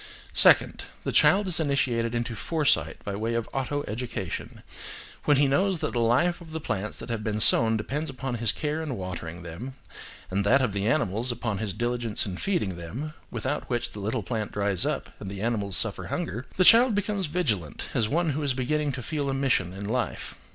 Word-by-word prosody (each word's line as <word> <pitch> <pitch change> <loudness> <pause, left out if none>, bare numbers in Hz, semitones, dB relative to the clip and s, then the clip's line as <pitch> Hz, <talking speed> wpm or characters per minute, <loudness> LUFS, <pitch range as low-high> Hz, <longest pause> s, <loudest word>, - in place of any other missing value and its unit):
Second. - - +4 0.2
The - - -1
child 200 0 +5
is 180 - +3
initiated 125 -6 +1
into 120 0 -2
foresight 110 - +1
by 100 - -3
way 115 +3 -1
of 115 -1 -1
auto 145 +2 -1
education; 110 -5 -5 0.6
when 145 -2 +5
he 140 0 +4
knows 185 +7 +2
that - - -3
the 120 - 0
life 130 +11 +2
of 160 -2 -11
the 160 - -2
plants 105 -7 -3
that - - -7
have 110 -2 -2
been 105 -1 -1
sown 110 +1 +5
depends 145 +9 -3
upon 135 -1 -4
his 115 -3 +3
care 150 +1 -2
in 145 -7 -4
watering 90 -2 -6
them, 95 +11 -7 0.6
and 100 +2 +1
that 120 +7 +5
of 130 -7 0
the 100 +1 -1
animals, 120 -2 +1
upon 115 -4 -3
his 105 -3 -2
diligence 120 -1 -1
in 95 -3 -4
feeding 135 - -1
them, 120 - -6 0.2
without 120 +6 -3
which 120 -1 -1
the 105 - -8
little 110 +3 -2
plant 105 +3 -3
dries 100 -3 +1
up - - -3
and 95 - -6
the 100 +1 -5
animals 105 -5 +1
suffer - - +3
hunger, 115 +9 -3
the 185 - +4
child 230 +1 +7
becomes 205 -3 -1
vigilant, 115 - -1
as 110 - +1
one 165 +1 +1
who 145 +2 -2
is 140 -3 +1
beginning 145 +3 0
to 130 -2 -5
feel 145 -1 -2
a 135 - -1
mission 130 -10 +1
in 95 +2 -7
life. 120 +3 -2
120 Hz, 205 wpm, -27 LUFS, 105-145 Hz, 0.6 s, child